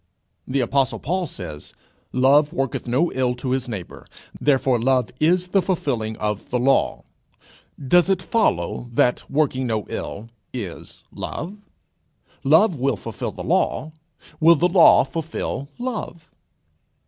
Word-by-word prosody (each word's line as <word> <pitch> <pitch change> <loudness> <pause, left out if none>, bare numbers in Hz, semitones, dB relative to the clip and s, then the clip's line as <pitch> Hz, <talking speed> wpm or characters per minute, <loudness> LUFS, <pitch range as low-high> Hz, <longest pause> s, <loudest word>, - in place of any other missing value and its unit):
The 135 +1 0
apostle 135 +2 +1
Paul 180 +2 -2
says: 80 - -8 0.4
"Love 140 +4 +4
worketh 135 -5 -2
no 135 +9 +1
ill 125 -1 0
to 125 +1 -4
his 130 -1 -1
neighbour, 100 -6 -7 0.3
therefore 135 -3 +2
love 125 -1 +1
is 180 +3 +2
the 195 +1 +3
fulfilling 125 - -2
of 105 -1 -3
the 125 - 0
law." 135 +3 +1 0.8
Does 175 +6 +4
it 190 -2 +2
follow 120 - 0
that 125 +1 +1
working 135 -3 0
no 110 -3 -1
ill 110 +3 -6 0.2
is 105 -9 -7
love? 185 +8 -6 0.8
Love 165 +9 +5
will 135 -3 +1
fulfil - - -5
the - - -8
law: 155 - 0 0.5
will 165 +2 +7
the 170 +3 +2
law 180 -1 +6
fulfil 140 -1 -4
love? 240 -9 -5
135 Hz, 135 wpm, -22 LUFS, 120-170 Hz, 0.8 s, will